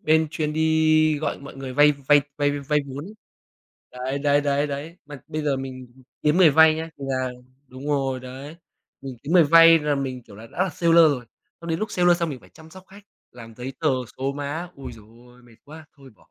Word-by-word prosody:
bên 160 Hz, 0 st, +2 dB
chuyên 150 Hz, -2 st, -3 dB
đi 155 Hz, -1 st, +2 dB
gọi 155 Hz, -, -3 dB
mọi 140 Hz, -1 st, -12 dB
người 135 Hz, -1 st, -7 dB
vay 145 Hz, +3 st, +5 dB
vay 145 Hz, +1 st, +3 dB, 0.2 s
vay 145 Hz, -1 st, +1 dB
vay 145 Hz, 0 st, -4 dB
vay 150 Hz, +2 st, 0 dB
vốn 140 Hz, +3 st, -7 dB
ấy. 210 Hz, +3 st, -11 dB, 0.8 s
Đấy, 130 Hz, +2 st, -4 dB
đấy, 145 Hz, 0 st, +2 dB
đấy, 145 Hz, 0 st, 0 dB
đấy. 145 Hz, +4 st, -6 dB
Mà 145 Hz, -3 st, -10 dB
bây 155 Hz, -1 st, -4 dB
giờ 140 Hz, -2 st, 0 dB
mình 130 Hz, -1 st, -7 dB, 0.4 s
kiếm 150 Hz, +2 st, +2 dB
người 180 Hz, -4 st, +6 dB
vay 160 Hz, +1 st, +6 dB
nhá, 160 Hz, +1 st, -6 dB
thì 140 Hz, -, -7 dB
là 130 Hz, -1 st, -2 dB, 0.4 s
đúng 130 Hz, +2 st, -10 dB
rồi 135 Hz, -3 st, -1 dB
đấy, 135 Hz, +5 st, -10 dB, 0.4 s
mình 135 Hz, -2 st, -8 dB
kiếm 150 Hz, +4 st, -5 dB
người 175 Hz, -3 st, +6 dB
vay 165 Hz, +2 st, +7 dB
là 150 Hz, -1 st, -1 dB
mình, 130 Hz, -2 st, -4 dB
kiểu, 105 Hz, -3 st, -16 dB
là 110 Hz, +2 st, -11 dB
đã -, -, -3 dB
là 190 Hz, -, -2 dB
seller 170 Hz, 0 st, +1 dB
rồi. 125 Hz, -3 st, -4 dB, 0.4 s
Xong 170 Hz, 0 st, -7 dB
đến 160 Hz, -, -1 dB
lúc 215 Hz, 0 st, -4 dB
seller 175 Hz, -1 st, +3 dB
xong 170 Hz, -, -1 dB
mình 130 Hz, -4 st, -7 dB
phải -, -, -19 dB
chăm 160 Hz, 0 st, -17 dB
sóc 185 Hz, +1 st, -14 dB
khách, 200 Hz, +2 st, -15 dB, 0.3 s
làm 115 Hz, -2 st, -12 dB
giấy 125 Hz, +3 st, -7 dB
tờ, -, -, +1 dB, 0.3 s
số 135 Hz, +1 st, -2 dB
má. 145 Hz, +5 st, -5 dB
Ôi 135 Hz, -, -9 dB
giời 110 Hz, -2 st, -15 dB, 0.2 s
ôi, 125 Hz, 0 st, -20 dB
mệt 115 Hz, -2 st, -20 dB
quá! 155 Hz, +2 st, -13 dB
Thôi 135 Hz, -2 st, -16 dB
bỏ. -, -, -26 dB
145 Hz, 235 wpm, -23 LUFS, 135-160 Hz, 0.8 s, vay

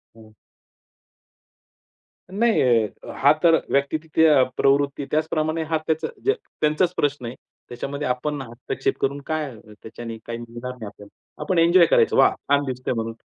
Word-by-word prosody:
हं. 110 Hz, -1 st, -16 dB, 2.0 s
नाही. 225 Hz, +3 st, +2 dB, 0.5 s
हां, 145 Hz, +2 st, +5 dB
तर 165 Hz, -1 st, +6 dB, 0.2 s
व्यक्ती 140 Hz, +2 st, +1 dB
तितक्या 155 Hz, -3 st, +3 dB
प्रवृत्ती 140 Hz, 0 st, +2 dB
त्याचप्रमाणे 155 Hz, +1 st, 0 dB
हा 160 Hz, -, +2 dB
त्याचा 160 Hz, 0 st, 0 dB, 0.2 s
ज 410 Hz, -, +1 dB, 0.3 s
त्यांचाच 155 Hz, +4 st, +2 dB
प्रश्न 145 Hz, -3 st, -1 dB
आहे. 120 Hz, +2 st, -6 dB, 0.3 s
त्याच्यामध्ये 140 Hz, +3 st, -4 dB
आपण 140 Hz, +3 st, -2 dB
हस्तक्षेप 120 Hz, -1 st, -4 dB
करून 140 Hz, +1 st, 0 dB
काय 155 Hz, -3 st, -2 dB, 0.3 s
त्याच्याने 115 Hz, 0 st, -8 dB
काही 115 Hz, 0 st, -5 dB
मिळणार 120 Hz, +2 st, -7 dB
नाही 125 Hz, -4 st, -9 dB
आपल्याला. 100 Hz, 0 st, -13 dB, 0.3 s
आपण 175 Hz, +3 st, -1 dB
एन्जॉय 170 Hz, +1 st, +6 dB
करायचं. -, -, +3 dB
"वाह! -, -, +5 dB
छान 145 Hz, 0 st, 0 dB
दिसतंय" 130 Hz, -1 st, -3 dB
म्हणून 115 Hz, 0 st, -3 dB
140 Hz, 140 wpm, -23 LUFS, 125-155 Hz, 2.0 s, तर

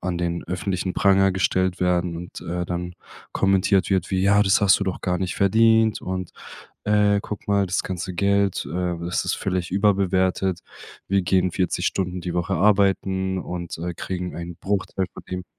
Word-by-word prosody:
an 90 Hz, -2 st, -2 dB
den 85 Hz, 0 st, -2 dB
öffentlichen 90 Hz, +1 st, -2 dB
Pranger 95 Hz, -1 st, +4 dB
gestellt 95 Hz, 0 st, 0 dB
werden 90 Hz, -1 st, +1 dB
und, 85 Hz, +1 st, -8 dB
äh, 90 Hz, +1 st, -3 dB
dann 90 Hz, 0 st, -4 dB, 0.4 s
kommentiert 95 Hz, 0 st, +2 dB
wird 95 Hz, -1 st, 0 dB
wie: 95 Hz, -1 st, +1 dB
„Ja, 100 Hz, +1 st, +4 dB
das 95 Hz, 0 st, +3 dB
hast 100 Hz, -2 st, +5 dB
du 100 Hz, -, 0 dB
doch 95 Hz, -, -3 dB
gar 90 Hz, -1 st, 0 dB
nicht 95 Hz, -1 st, -2 dB
verdient, 110 Hz, +2 st, +3 dB
und, 90 Hz, -1 st, -4 dB, 0.5 s
äh, 105 Hz, -1 st, +3 dB
guck 105 Hz, -, -7 dB
mal, 100 Hz, -1 st, +2 dB
das 90 Hz, -, -1 dB
ganze 90 Hz, 0 st, -4 dB
Geld, 100 Hz, +1 st, +1 dB
äh, 90 Hz, 0 st, -2 dB
das 85 Hz, +1 st, -2 dB
ist -, -, 0 dB
völlig 90 Hz, -2 st, -2 dB
überbewertet. 95 Hz, -2 st, +1 dB, 0.5 s
Wir 100 Hz, -1 st, +3 dB
gehen 90 Hz, +1 st, +2 dB
40 90 Hz, -, -1 dB
Stunden 90 Hz, -2 st, -2 dB
die 90 Hz, -1 st, -4 dB
Woche 85 Hz, 0 st, -1 dB
arbeiten 95 Hz, 0 st, +2 dB
und, 85 Hz, -2 st, -6 dB
äh, 85 Hz, +1 st, -3 dB
kriegen 90 Hz, +1 st, -5 dB
einen 85 Hz, 0 st, -6 dB
Bruchteil 95 Hz, -1 st, -2 dB
von -, -, -11 dB
dem.“ 90 Hz, 0 st, -4 dB
95 Hz, 175 wpm, -23 LUFS, 90-100 Hz, 0.5 s, hast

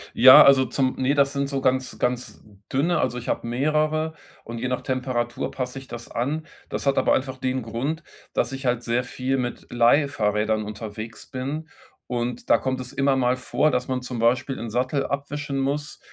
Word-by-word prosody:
Ja, 130 Hz, +2 st, +10 dB
also 135 Hz, -1 st, +6 dB
zum 130 Hz, +1 st, 0 dB
ne, 130 Hz, +2 st, +2 dB
das 140 Hz, -1 st, +3 dB
sind 140 Hz, 0 st, 0 dB
so 135 Hz, -1 st, -2 dB
ganz 130 Hz, 0 st, 0 dB
ganz 125 Hz, 0 st, -2 dB, 0.3 s
dünne 160 Hz, +5 st, +2 dB
also 125 Hz, -1 st, 0 dB
ich 120 Hz, -, -7 dB
habe -, -, -1 dB
mehrere 155 Hz, +5 st, +1 dB, 0.3 s
und 115 Hz, 0 st, -7 dB
je 130 Hz, -, -2 dB
nach 125 Hz, 0 st, -1 dB
Temperatur 125 Hz, -2 st, -2 dB
passe 130 Hz, +1 st, -4 dB
ich 135 Hz, -, -13 dB
das 120 Hz, -1 st, -8 dB
an. 145 Hz, +7 st, -2 dB, 0.2 s
Das -, -, -4 dB
hat 140 Hz, -1 st, +2 dB
aber -, -, +3 dB
einfach 130 Hz, 0 st, -1 dB
den 130 Hz, 0 st, -1 dB
Grund, 135 Hz, +8 st, -3 dB, 0.3 s
dass 120 Hz, -, 0 dB
ich 135 Hz, 0 st, -6 dB
halt 125 Hz, -1 st, +1 dB
sehr 120 Hz, +1 st, 0 dB
viel 130 Hz, +2 st, -2 dB
mit 120 Hz, -2 st, -4 dB
Leihfahrrädern 110 Hz, -4 st, +2 dB
unterwegs 110 Hz, +1 st, -7 dB
bin 145 Hz, +5 st, -4 dB, 0.4 s
und 120 Hz, 0 st, -3 dB
da -, -, +7 dB
kommt 130 Hz, -1 st, -2 dB
es 125 Hz, 0 st, -8 dB
immer 135 Hz, 0 st, +2 dB
mal 125 Hz, -1 st, +2 dB
vor, 135 Hz, +4 st, +1 dB
dass 125 Hz, -2 st, -1 dB
man 130 Hz, -1 st, -1 dB
zum 125 Hz, -1 st, -5 dB
Beispiel 120 Hz, +3 st, +1 dB
'n 115 Hz, -, -5 dB
Sattel 130 Hz, +4 st, 0 dB
abwischen 140 Hz, 0 st, -3 dB
muss, 145 Hz, +2 st, -2 dB
130 Hz, 195 wpm, -24 LUFS, 120-140 Hz, 0.4 s, Ja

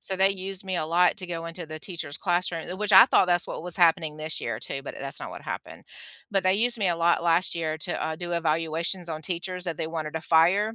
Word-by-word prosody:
So 190 Hz, -, 0 dB
they 190 Hz, +1 st, +4 dB
used 195 Hz, 0 st, -5 dB
me 185 Hz, -1 st, -2 dB
a 155 Hz, -, -1 dB
lot 175 Hz, +2 st, +3 dB
to 185 Hz, -, -5 dB
go 165 Hz, -1 st, -5 dB
into 165 Hz, +1 st, -6 dB
the 155 Hz, 0 st, -7 dB
teacher's 165 Hz, -6 st, -5 dB
classroom, 175 Hz, -2 st, -1 dB
uh, 185 Hz, -, -4 dB
which 210 Hz, 0 st, -1 dB
I 210 Hz, +6 st, +10 dB
thought 215 Hz, -, +4 dB
that's 175 Hz, -1 st, +2 dB
what -, -, -6 dB
was 180 Hz, -1 st, -1 dB
happening 165 Hz, -3 st, +3 dB
this 155 Hz, +1 st, -3 dB
year 115 Hz, -2 st, -3 dB
too, 135 Hz, -, -5 dB
but 145 Hz, -, -7 dB
that -, -, -10 dB
that's 135 Hz, -, -3 dB
not -, -, -6 dB
what -, -, -9 dB
happened. -, -, -7 dB, 0.5 s
But 195 Hz, -1 st, +1 dB
they 185 Hz, 0 st, +4 dB
used 235 Hz, +4 st, +2 dB
me 195 Hz, -3 st, +1 dB
a 170 Hz, -, 0 dB
lot 170 Hz, 0 st, +2 dB
last 170 Hz, +2 st, +2 dB
year 160 Hz, -2 st, -2 dB
to, -, -, -2 dB
uh, 160 Hz, -, -3 dB
do 175 Hz, +1 st, -5 dB
evaluations 165 Hz, +2 st, -1 dB
on 155 Hz, -1 st, -5 dB
teachers 180 Hz, +1 st, -3 dB
that 170 Hz, -4 st, -1 dB
they -, -, -2 dB
wanted 160 Hz, -1 st, -5 dB
to 160 Hz, -, -2 dB
fire. 180 Hz, +7 st, +3 dB
170 Hz, 270 wpm, -26 LUFS, 160-185 Hz, 0.5 s, I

